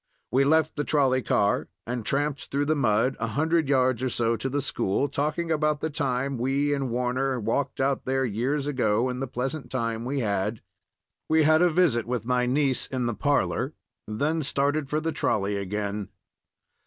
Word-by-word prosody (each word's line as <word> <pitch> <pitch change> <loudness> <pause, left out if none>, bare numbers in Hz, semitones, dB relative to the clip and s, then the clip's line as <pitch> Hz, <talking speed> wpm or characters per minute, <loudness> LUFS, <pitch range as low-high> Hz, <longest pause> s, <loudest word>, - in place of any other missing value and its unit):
We 135 +2 +4
left 160 +1 +2
the 145 - 0
trolley 135 -4 +2
car 100 -4 +1 0.2
and 120 0 -3
tramped 145 +3 -1
through 140 +1 0
the 155 +2 +2
mud 120 -1 +2
a 115 - -1
hundred 155 +5 +1
yards 130 -3 +2
or 130 - 0
so 115 -1 +1
to 135 - -3
the 145 +2 -1
school, 135 -2 0
talking 150 +4 -2
about 150 -1 +1
the 160 - -2
time 135 -2 -1
we 140 +4 +1
and 135 -2 -1
Warner 125 +2 0
walked 115 +6 -1
out 135 0 0
there 135 0 +1
years 125 +6 -1
ago, 125 -4 +1
and 125 +1 -4
the 135 - -2
pleasant 135 +5 -4
time 115 -3 -2
we 135 +2 -2
had. 105 0 -1 0.7
We 160 0 +4
had 155 +2 +5
a 180 - +5
visit 155 -10 +2
with 120 -3 -2
my 125 0 +1
niece 135 0 +1
in 130 -2 -2
the 120 - 0
parlor, 140 +2 0 0.3
then 145 +10 0
started 140 0 0
for 150 - 0
the 160 +1 -2
trolley 105 -8 0
again. 100 0 -3
135 Hz, 185 wpm, -26 LUFS, 120-145 Hz, 0.7 s, had